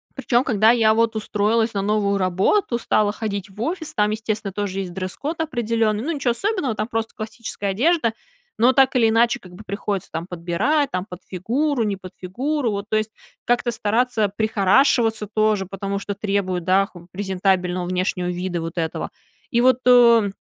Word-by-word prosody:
Причем 245 -1 +1
когда 220 -4 +3
я 225 -2 +4
вот 230 0 +1
устроилась 220 +1 0
на 200 - -1
новую 200 -1 +1
работу, 190 - +1
стала 210 -3 +1
ходить 205 -3 -4
в 200 +2 -16
офис, 320 0 -3
там, 210 0 +2
естественно, 215 -2 -3
тоже 195 -1 -3
есть 180 -2 -6
дресс-код 280 - -4
определенный. 230 -6 0
Ну, 330 - -2
ниче 275 -5 -1
особенного, 290 - -1
там 215 - -2
просто 225 -1 -3
классическая 215 -2 -5
одежда, 250 - +2 0.5
но 250 +3 +5
так 265 0 +4
или 225 -3 +4
иначе, 235 +1 +3
как 180 -1 -14
бы 215 - -11
приходится 200 -1 -4
там 165 +2 -4
подбирать, 180 - 0
там, 185 +1 -2
под 180 0 -9
фигуру, 240 - -1
не 200 -2 -1
под 185 -1 -11
фигуру, 255 +8 -1
вот 200 0 -3
то 215 - 0
есть 215 0 -1 0.4
как-то 240 0 +1
стараться 220 -1 0
прихорашиваться 220 +1 +3
тоже, 215 -3 +2
потому 195 +1 -4
что 200 0 -4
требуют, 195 -3 -1
да, 190 +2 +3
х 175 -2 -15
презентабельного 185 -2 0
внешнего 180 0 -1
вида 180 -1 -3
вот 165 +2 -6
этого. 160 -1 -2 0.4
И 235 0 +2
вот, 255 0 +4
э, 235 -4 +6
215 Hz, 175 wpm, -22 LUFS, 190-235 Hz, 0.5 s, э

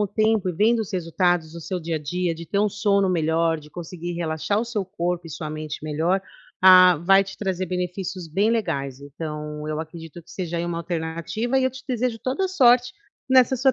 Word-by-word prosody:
o 205 - +2
tempo 215 -1 +1
e - - -1
vendo 225 +6 +3
os 210 - -5
resultados 175 -2 0
no 170 - -7
seu 180 +2 -4
dia 165 0 -3
a - - -2
dia, 170 +3 -2
de 170 +1 -8
ter 200 - -2
um 210 +1 +3
sono 200 -1 +1
melhor, 165 -1 +1
de 150 0 -14
conseguir 175 +1 -6
relaxar 170 +5 -1
o - - -2
seu 220 -4 -3
corpo 175 -2 -3
e - - -9
sua 155 +1 -5
mente 155 -1 -6
melhor, 160 +5 0 0.4
ah, 185 -2 +8
vai 195 +3 +5
te 195 - -10
trazer 190 -2 -2
benefícios 180 -1 -4
bem 200 +7 +2
legais, 140 - -2
então 150 +1 -6
eu 155 0 -2
acredito 165 0 -9
que - - -19
seja, 175 -2 -4
aí, 170 - -2
uma 170 -1 -3
alternativa 170 +9 -2
e 260 - +1
eu 260 - +2
te 260 +1 -11
desejo 245 -2 -1
toda 270 +12 -1
sorte 250 -7 +4 0.4
nessa 260 0 +5
sua 265 +1 +3
180 Hz, 215 wpm, -23 LUFS, 160-205 Hz, 0.4 s, ah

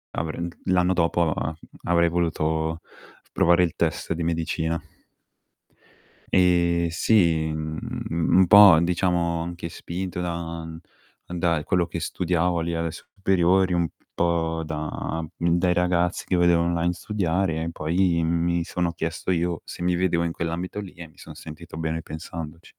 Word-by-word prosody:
avrem 80 +2 -3 0.2
l'anno 90 0 +3
dopo 85 -2 +1
a 80 +1 -3 0.3
avrei 85 0 +3
voluto 80 -1 -1 0.5
provare 85 +1 +4
il 85 - 0
test 85 0 -1
di 85 - -3
medicina. 80 0 -1 1.6
E 85 -2 +3
sì, 85 -2 +3
mhmm, 80 0 -5 0.3
un 95 0 +6
po', 100 -4 +9
diciamo 85 -1 0
anche 85 0 -6
spinto 90 +2 -5
da 85 -2 -4 0.6
da 85 -3 0
quello 90 0 +1
che 85 0 -5
studiavo 90 0 0
lì 85 +1 -2
alle 85 0 -1
superiori 95 0 +1
un 85 -1 +1 0.3
po' 80 -1 0
da, 80 +1 -4
mhmm, 85 +2 -1
dai 90 -1 +2
ragazzi 90 0 +1
che 95 - 0
vedevo 85 -1 +4
online 85 0 0
studiare 90 -3 -1
e 80 - -2
poi 85 +1 +1
mi 85 +1 +1
sono 85 0 -2
chiesto 85 +2 -4
io 85 -2 0
se - - -7
mi 90 0 +2
vedevo 85 -1 +1
in 85 - -1
quell'ambito 85 +4 -4
lì 100 -3 -8
e 85 -1 -10
mi 75 - -22
son - - -11
sentito 80 +1 -10
bene 80 0 -2
pensandoci. 80 0 -8
85 Hz, 145 wpm, -24 LUFS, 80-90 Hz, 1.6 s, po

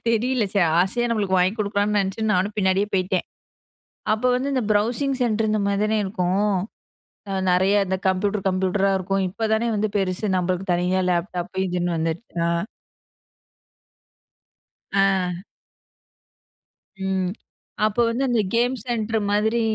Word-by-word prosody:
தெரியல. 240 +1 +1
சரி 190 -4 +4 0.2
ஆசையா 240 +6 +1
நம்மளுக்கு 200 -4 +1
வாங்கி 180 +2 +3
குடுக்குறானேனு 205 0 +1
நென்ச்சு 195 +3 -3
நானும் 195 +3 0
பின்னாடியே 190 +1 +2
போயிட்டேன். 185 -1 0 0.9
அப்போ 225 +4 0
வந்து 270 +3 -1
இந்த 255 - +1
ப்ரௌசிங் 245 +6 +1
சென்டர் 220 -2 +1
இந்த 215 - +1
மாரி 200 0 0
தானே 215 0 +1
இருக்கும். 190 +1 0 0.8
அ - - -2 0.2
நெறைய 190 +3 +3
இந்த 190 0 0
கம்ப்யூட்டர், 195 +1 0
கம்ப்யூட்டரா 190 +1 +1
இருக்கும். 195 +1 -1
இப்போதானே 220 +3 0
வந்து 210 0 0
பெருசு 190 +2 -1
நம்மளுக்கு 180 +2 -1
தனியா 180 +2 +1
லேப்டாப் 175 +1 -2
இதுன்னு 175 -1 -1
வந்துர்க்கு 165 +4 -4
அ. 170 +3 0 2.3
ஆ. 190 -2 +1 1.6
ம். 190 -1 0 0.5
அப்ப 215 0 +1
வந்து 245 +4 -1
இந்த 235 -2 +2
கேம் 245 +2 +2
சென்டர் 225 -2 -1
மாதிரி, 220 +3 +2
200 Hz, 130 wpm, -23 LUFS, 185-220 Hz, 2.3 s, சரி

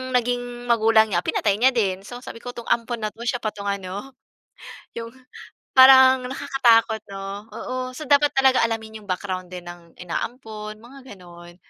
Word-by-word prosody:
naging 245 0 -2
magulang 220 -1 +4
niya, 175 0 0
pinatay 205 -2 +1
niya 260 +3 +5
din. 195 -5 0
So, 245 +3 -9
sabi 230 - -9
ko 245 - -6
"'Tong 235 -1 -9
ampon 235 0 -1
na' 215 -1 -3
to, 230 - -10
siya 245 0 -1
pa 215 - -1
'tong 200 -1 -9
ano, 200 +6 -5 0.8
’yong", 230 0 -6 0.7
parang 260 -1 +8
nakakatakot 235 -4 +2
'no, 195 0 -7 0.3
oo. 255 - -6 0.2
So, - - -6
dapat 290 0 +4
talaga 265 -1 +4
alamin 220 -1 -5
’yong 205 - -18
background 185 -1 -4
din 180 -1 -8
ng 170 -1 -13
inaampon, 215 +3 -6
mga 260 -1 -13
gano'n. 175 -1 -14
225 Hz, 170 wpm, -23 LUFS, 200-245 Hz, 0.8 s, parang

